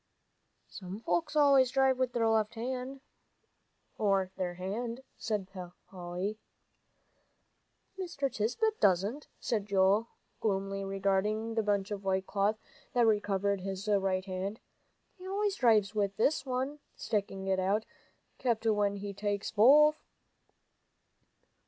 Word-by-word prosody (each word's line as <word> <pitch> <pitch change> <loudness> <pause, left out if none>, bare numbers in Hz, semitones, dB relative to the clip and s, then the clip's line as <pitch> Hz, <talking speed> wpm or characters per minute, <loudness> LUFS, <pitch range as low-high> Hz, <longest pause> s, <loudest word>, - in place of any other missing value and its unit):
"Some 190 +1 -8
folks 310 +5 -1
always 280 -4 +5
drive 265 0 +2
with 255 -2 0
their 230 -2 +2
left 220 0 +1
hand," 255 +3 -4 2.1
said 210 -4 -3 0.4
Polly. 185 +3 -5 1.6
"Mr. 285 -7 -2
Tisbett 430 - 0
doesn't," 200 +9 +2
said 215 -5 -2
Joel, 200 +3 +3 0.3
gloomily 195 -1 -1
regarding 195 +3 0
the 225 - +1
bunch 205 -1 0
of 200 -1 -4
white 190 0 0
cloth 205 +2 0 0.4
that 225 -4 +4
covered 200 -1 0
his 195 +2 -5
right 195 -2 +1
hand. 195 +3 -4 0.6
"He 370 - -9
always 400 +1 0
drives 215 -5 +3
with 200 -2 -1
this 275 +3 +1
one," 265 +3 -2 0.2
sticking 200 -3 -2
it 190 -1 +1
out, 200 +4 +1 0.6
"'cept 235 -3 0
when 205 -2 +2
he 200 0 -5
takes 205 0 -2
both." 300 +8 +6
210 Hz, 115 wpm, -31 LUFS, 195-250 Hz, 2.1 s, both